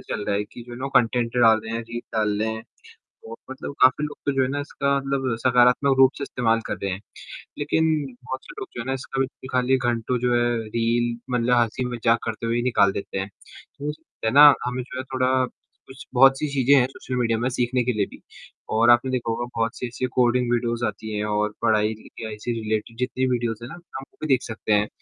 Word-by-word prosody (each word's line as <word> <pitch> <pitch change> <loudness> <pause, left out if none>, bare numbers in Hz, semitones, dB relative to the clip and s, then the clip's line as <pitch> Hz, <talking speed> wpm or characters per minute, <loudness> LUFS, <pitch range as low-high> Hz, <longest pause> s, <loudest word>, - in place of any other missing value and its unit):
चल 105 - -4
रहा 100 - 0
है 105 - -1
कि 120 - -12
जो 120 - -10
है 120 - -7
ना 135 +1 -3
कंटेंट 120 0 +2
डाल 115 -2 +6
दें 110 0 -8
हैं 115 - -2
रील 115 +1 -6 0.2
डाल 105 -1 +1
रहे 110 - +1
हैं। 110 - -7 0.7
और 115 - -7
मतलब 130 +1 -6
काफ़ी 130 +4 +5
लोग 150 -1 -6
तो 140 - +2
जो 130 - +4
है 130 - +1
ना, 145 +2 -2
इसका 140 -1 -1
मतलब 135 -3 -1
सकारात्मक 125 +2 +4
रूप 130 0 +7
से - - -5
इस्तेमाल 115 -4 0
कर - - -2
रहे 100 - -1
हैं, 95 - -4 0.6
लेकिन 150 +2 +1 0.4
बहुत 130 +1 -5
से - - -11
लोग - - -6
जो 120 - -3
है - - -7
ना, 135 - 0
इसका 135 0 -5
भी - - +3
निकालिए 130 0 -1
घंटों 120 +1 -1
जो 125 0 +1
है 120 0 +3 0.2
रील 115 +1 0
मतलब 125 0 +2
हँसी-मज़ाक 120 0 +1
करते 115 +1 -4
हुए 115 - 0
ही 120 - +1
निकाल 100 -6 +3
देते 95 0 -4
हैं। 95 +1 -4 0.5
तो 145 - -3
उससे 150 -6 -5
ना 145 +2 +9 0.2
हमें 125 +1 -2
जो 125 - -9
है 130 - -3
थोड़ा 130 0 +1 0.6
कुछ 130 0 -11
बहुत 135 +1 +6
सी 150 - -1
चीज़ें 135 0 +4
हैं 130 -3 +5
सोशल 130 -1 -7
मीडिया 115 -2 +1
में 120 - 0
सीखने 125 0 0
के 125 - +1
लिए 105 -2 +1
भी - - -15 0.6
और 115 +1 +5
आपने 120 +2 +5
देखा 120 -3 -1
होगा 120 +1 -2
बहुत 115 +1 -1
से 125 - -3
ऐसी 125 +2 -3
कोडिंग 125 0 +2
वीडियोज़ 120 0 0
आती 105 0 -4
हैं, 105 - -1
और 105 0 0
पढ़ाई 110 -1 +2 0.3
या 110 - -4
ऐसी 105 +3 -4
रिलेटेड 110 +1 -3
जितनी 125 +1 -1
वीडियोज़ 120 -2 -1
हैं 120 - -7
ना - - -8
हम 175 -6 -10
वो - - -32
भी 155 - -2
देख 130 -2 +3
सकते 110 -1 -5
हैं। 105 +1 +3
120 Hz, 235 wpm, -24 LUFS, 115-130 Hz, 0.7 s, ना